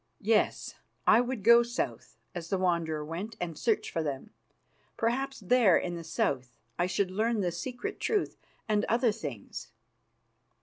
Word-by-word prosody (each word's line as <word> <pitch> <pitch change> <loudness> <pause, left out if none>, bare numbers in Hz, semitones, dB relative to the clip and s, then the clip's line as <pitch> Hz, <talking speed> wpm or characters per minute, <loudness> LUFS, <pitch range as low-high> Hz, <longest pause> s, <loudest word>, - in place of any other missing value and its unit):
Yes, 215 +1 +1 0.3
I - - +6
would 245 -4 -3
go 235 +2 +8
south, 125 - -4 0.2
as 170 -1 -6
the 195 - +1
Wanderer 170 -4 0
went, 185 +8 -5
and 170 -2 -3
search 225 +6 0
for 165 - -1
them. 145 +6 -4 0.7
Perhaps 265 +3 -1
there 205 -2 +5
in 175 - -2
the 170 -1 -6
South 130 -5 -1 0.3
I 175 - +2
should 185 0 0
learn 220 +2 +1
the 180 -2 0
secret 245 +9 -5
truth 430 -2 0 0.3
and 210 -1 +2
other 235 0 +2
things. 145 - -7
195 Hz, 150 wpm, -30 LUFS, 165-235 Hz, 0.7 s, go